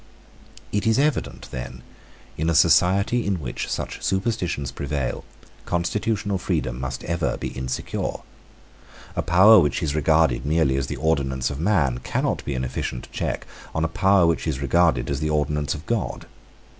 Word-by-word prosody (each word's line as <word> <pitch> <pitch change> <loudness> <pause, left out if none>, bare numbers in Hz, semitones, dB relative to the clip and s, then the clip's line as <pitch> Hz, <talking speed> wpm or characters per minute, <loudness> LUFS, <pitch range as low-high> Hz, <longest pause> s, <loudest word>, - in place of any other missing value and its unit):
It 105 +2 0
is 110 - +3
evident 145 +1 0
that, 65 0 -5 0.6
in 80 +2 -1
a 85 - +1
society 100 +10 +4
in 100 -3 -1
which 65 -6 -4
such - - -4
superstitions 95 - -1
prevail, 70 -2 -3 0.4
constitutional 100 +3 -1
freedom - - -2
must 65 -1 -4
ever 85 -1 -1
be - - -4
insecure. 65 -1 -3 1.0
A - - 0
power 95 +6 +7
which 75 -6 +1
is 75 -3 0
regarded 75 -4 +2
merely 75 -2 +2
as 70 0 -1
the - - -4
ordinance 70 -5 0
of 70 - -6
man 80 - +1
cannot - - -1
be 70 - -2
an 65 - -2
efficient 65 -1 -4
check - - -3 0.3
on 80 0 +1
a - - +1
power 95 +2 +3
which 85 0 +1
is 70 -4 -1
regarded 70 -2 +2
as 70 -1 -2
the 75 0 -1
ordinance 75 -2 0
of 75 - -9
God. 115 -4 -2
80 Hz, 160 wpm, -23 LUFS, 65-95 Hz, 1.0 s, power